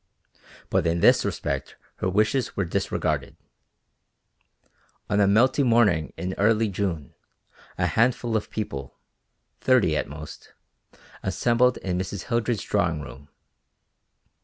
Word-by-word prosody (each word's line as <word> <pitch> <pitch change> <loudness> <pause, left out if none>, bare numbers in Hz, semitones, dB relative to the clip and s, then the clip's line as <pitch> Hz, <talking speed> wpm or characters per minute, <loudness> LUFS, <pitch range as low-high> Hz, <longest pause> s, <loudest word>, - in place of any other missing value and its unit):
But - - +2
in 85 +1 0
this - - +5
respect 70 0 -3 0.2
her 95 - -1
wishes 110 +6 0
were 100 - +1
disregarded. 85 - -2 1.7
On 100 - +2
a 100 - +4
melting 130 +6 +3
morning 110 -9 +3
in 90 +3 -3
early 110 +1 +3
June, 90 -8 -3 0.6
a 90 - +1
handful 115 +5 +1
of 110 - -1
people, 70 -11 -5 0.6
thirty 125 -12 +3
at - - -2
most, 75 +1 -10 0.7
assembled 120 +6 +2
in 90 -1 -3
Mrs. 95 0 -4
Hildred's 115 -2 -1
drawing 85 -7 0
room. 70 +1 -11
100 Hz, 115 wpm, -25 LUFS, 85-115 Hz, 1.7 s, this